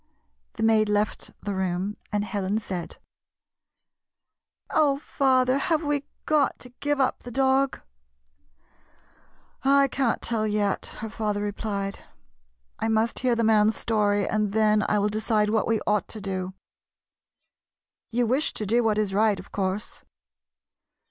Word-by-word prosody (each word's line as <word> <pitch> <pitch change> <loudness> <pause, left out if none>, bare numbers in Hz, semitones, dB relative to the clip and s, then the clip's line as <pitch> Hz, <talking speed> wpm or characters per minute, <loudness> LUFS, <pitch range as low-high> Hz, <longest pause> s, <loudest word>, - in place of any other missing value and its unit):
The 220 - -4
maid 220 -1 +4
left 210 0 0
the 205 - -2
room, 190 +2 -2 0.2
and 205 -1 0
Helen 200 0 -1
said: 185 -5 -5 0.9
" - - -64
Oh, 290 -3 +3
father, 260 -2 +2
have 320 +2 0
we 290 -1 -1 0.2
got 300 -3 +2
to 250 - -10
give 290 -1 0
up 265 - +1
the 245 - -10
dog?" 265 +2 +1 0.9
" - - -35 0.2
I - - +3
can't 260 -3 0
tell 220 -2 -1
yet," 205 -2 0
her 220 - -4
father 210 -2 -2
replied. 200 -1 -3 0.4
" - - -46
I - - 0
must 225 +1 +1
hear 250 -1 +2
the 230 - 0
mail's 215 0 +4
story, 205 -3 +1
and 210 -2 0
then 215 -1 +3
I 210 - +2
will 205 +1 +2
de 215 +1 -2
cide 210 -1 +2
what 220 -1 +1
we 225 -1 +2
ought 210 -3 +1
to 220 - -7
do. 190 -2 -4 1.5
You 240 +1 +1
wish 260 +7 +1
to 215 - -3
do 235 +4 +2
what 215 -2 +2
is 210 -2 0
right, 210 -1 +3
of 185 - -12
course 195 +1 -3
215 Hz, 155 wpm, -26 LUFS, 205-245 Hz, 1.5 s, maid